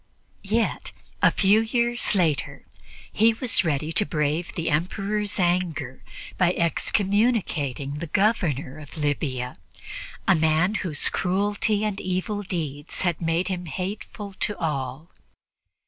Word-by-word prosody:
Yet 220 Hz, +3 st, -1 dB, 0.3 s
a -, -, +7 dB
few 205 Hz, +2 st, +4 dB
years 235 Hz, 0 st, +1 dB
later 165 Hz, -6 st, 0 dB, 0.5 s
he 225 Hz, +1 st, +4 dB
was 225 Hz, -7 st, +3 dB
ready 155 Hz, -1 st, 0 dB
to 210 Hz, -, +3 dB
brave 155 Hz, -1 st, -1 dB
the 165 Hz, -, -1 dB
Emperor's 200 Hz, +6 st, -1 dB
anger 175 Hz, -7 st, 0 dB, 0.4 s
by 180 Hz, -1 st, +4 dB
excommunicating 170 Hz, -, +1 dB
the 170 Hz, -, -4 dB
Governor 160 Hz, -, +1 dB
of 150 Hz, +2 st, -11 dB
Libya, 140 Hz, -4 st, -1 dB, 0.7 s
a 195 Hz, -, +7 dB
man 160 Hz, +3 st, +3 dB
whose 160 Hz, -6 st, +1 dB
cruelty 205 Hz, +3 st, +1 dB
and 205 Hz, -2 st, -2 dB
evil 185 Hz, +3 st, -2 dB
deeds 155 Hz, -6 st, -4 dB
had 175 Hz, -3 st, 0 dB
made 165 Hz, +2 st, +1 dB
him 180 Hz, -2 st, -3 dB
hateful 195 Hz, +5 st, -5 dB
to 210 Hz, -, 0 dB
all. 145 Hz, -1 st, -3 dB
180 Hz, 120 wpm, -25 LUFS, 155-205 Hz, 0.7 s, a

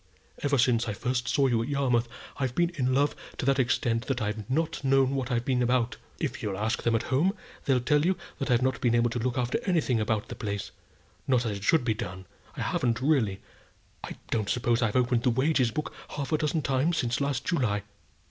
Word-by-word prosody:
Ever 145 Hz, -1 st, +2 dB
since 120 Hz, -2 st, +3 dB
I 105 Hz, -, -1 dB
first 125 Hz, +3 st, -2 dB
saw 140 Hz, -, +3 dB
you 120 Hz, -4 st, +2 dB
at 115 Hz, -, -3 dB
Yarmouth, 125 Hz, -4 st, +1 dB, 0.3 s
I've 130 Hz, -3 st, -2 dB
been 175 Hz, 0 st, +2 dB
in 130 Hz, -6 st, 0 dB
love 140 Hz, +3 st, +2 dB, 0.2 s
to -, -, -3 dB
that 135 Hz, 0 st, +3 dB
extent 120 Hz, -1 st, +1 dB
that 135 Hz, -2 st, 0 dB
I've 105 Hz, -1 st, -3 dB
not 155 Hz, +2 st, -1 dB
known 135 Hz, 0 st, +3 dB
what 135 Hz, -2 st, -2 dB
I've 120 Hz, -1 st, 0 dB
been 125 Hz, -2 st, +1 dB
about. 125 Hz, 0 st, +1 dB, 0.2 s
If -, -, -3 dB
you'll 100 Hz, -2 st, -3 dB
ask 110 Hz, +3 st, -1 dB
them 115 Hz, -1 st, +1 dB
at 115 Hz, -, 0 dB
home, 180 Hz, +10 st, +3 dB, 0.3 s
they'll 135 Hz, -4 st, +3 dB
tell 150 Hz, +3 st, +2 dB
you 185 Hz, +2 st, +2 dB, 0.2 s
that 135 Hz, -1 st, -2 dB
I've 125 Hz, 0 st, +3 dB
not 130 Hz, -2 st, 0 dB
been 120 Hz, -1 st, +3 dB
able 120 Hz, 0 st, +2 dB
to 120 Hz, -, -2 dB
look 125 Hz, +2 st, -1 dB
after 125 Hz, -1 st, 0 dB
anything 160 Hz, -, +1 dB
about 110 Hz, -1 st, -1 dB
the -, -, -4 dB
place, 100 Hz, -2 st, -4 dB, 0.6 s
not 125 Hz, -2 st, +2 dB
as 105 Hz, -3 st, -2 dB
it -, -, -12 dB
should 155 Hz, +2 st, +3 dB
be 115 Hz, -, +2 dB
done. 95 Hz, -2 st, -6 dB, 0.3 s
I -, -, -3 dB
haven't 115 Hz, -2 st, 0 dB
really. 125 Hz, -9 st, +1 dB, 0.6 s
I -, -, -7 dB
don't 110 Hz, -3 st, 0 dB
suppose 120 Hz, -1 st, +1 dB
I've 110 Hz, -3 st, 0 dB
opened 125 Hz, -2 st, +2 dB
the 125 Hz, -, +2 dB
wages 130 Hz, +1 st, +2 dB
book 150 Hz, +7 st, -4 dB, 0.2 s
half 140 Hz, 0 st, -4 dB
a 155 Hz, -, +3 dB
dozen 155 Hz, 0 st, 0 dB
times 140 Hz, +5 st, +1 dB
since 120 Hz, 0 st, 0 dB
last 140 Hz, -3 st, -1 dB
July." 115 Hz, -, 0 dB
125 Hz, 225 wpm, -28 LUFS, 115-140 Hz, 0.6 s, since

